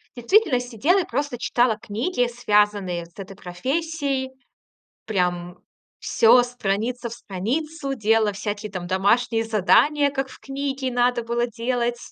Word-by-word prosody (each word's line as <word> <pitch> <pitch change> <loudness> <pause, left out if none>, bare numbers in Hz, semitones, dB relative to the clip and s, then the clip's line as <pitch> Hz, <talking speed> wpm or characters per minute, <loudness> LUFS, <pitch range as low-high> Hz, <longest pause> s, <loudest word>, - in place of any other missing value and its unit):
действительно 260 - +3
сидела 250 - +1
и - - +1
просто 280 0 -2
читала 240 -2 +2
книги, 245 - -1
связанные 205 -6 +1
с 170 - -29
этой 195 -1 -8
профессией. 270 - -2 0.8
Прям 180 -3 -1 0.4
всё 240 +2 +5
страница 240 +1 -2
в - - -7
страницу 270 - -3
делала, 220 -2 +2
всякие 205 +1 -4
там 185 -3 -5
домашние 225 +5 +2
задания, 280 +8 +3
как 270 -1 -3
в 255 - -13
книге 270 -1 -3
надо 245 0 +1
было 235 +1 -1
делать. 240 +1 -2
240 Hz, 130 wpm, -23 LUFS, 210-265 Hz, 0.8 s, всё